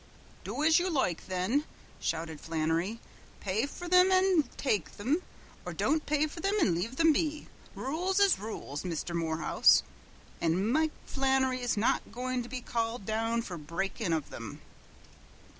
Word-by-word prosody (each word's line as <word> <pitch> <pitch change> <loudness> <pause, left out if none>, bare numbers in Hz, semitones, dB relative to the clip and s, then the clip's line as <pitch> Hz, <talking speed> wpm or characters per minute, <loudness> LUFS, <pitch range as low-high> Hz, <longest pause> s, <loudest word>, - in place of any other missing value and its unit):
"Do 295 - -3
as 320 +2 +6
you 365 +1 0
loike, 265 - 0
then!" 190 +10 0 0.4
shouted 160 -1 -3
Flannery, 165 +6 -1 0.4
"pay 210 +7 0
for 350 +4 -8
thim 365 +1 +6
an' 370 -7 +4
take 210 - 0
thim, 270 - -1 0.4
or - - -5
don't 310 +1 0
pay 300 0 +2
for 310 +2 -7
thim 395 +3 +1
and 200 - +3
leave 195 +10 -2
thim 325 +2 +5
be. 300 0 -1 0.3
Rules 360 +8 -1
is 400 - +5
rules, 195 -9 -5
Misther 170 -1 -3
Morehouse, 165 -1 +3 0.6
an' 180 +7 +1
Mike 315 +3 +3 0.2
Flannery's 265 -3 +1
not 215 - +1
goin' 255 +1 -2
to 240 - -8
be 255 0 -4
called 230 -2 -2
down 225 +2 0
fer 180 -6 -6
breakin' 170 +5 -3
of 160 -3 0
thim." 115 -3 -8
235 Hz, 155 wpm, -30 LUFS, -, 0.6 s, as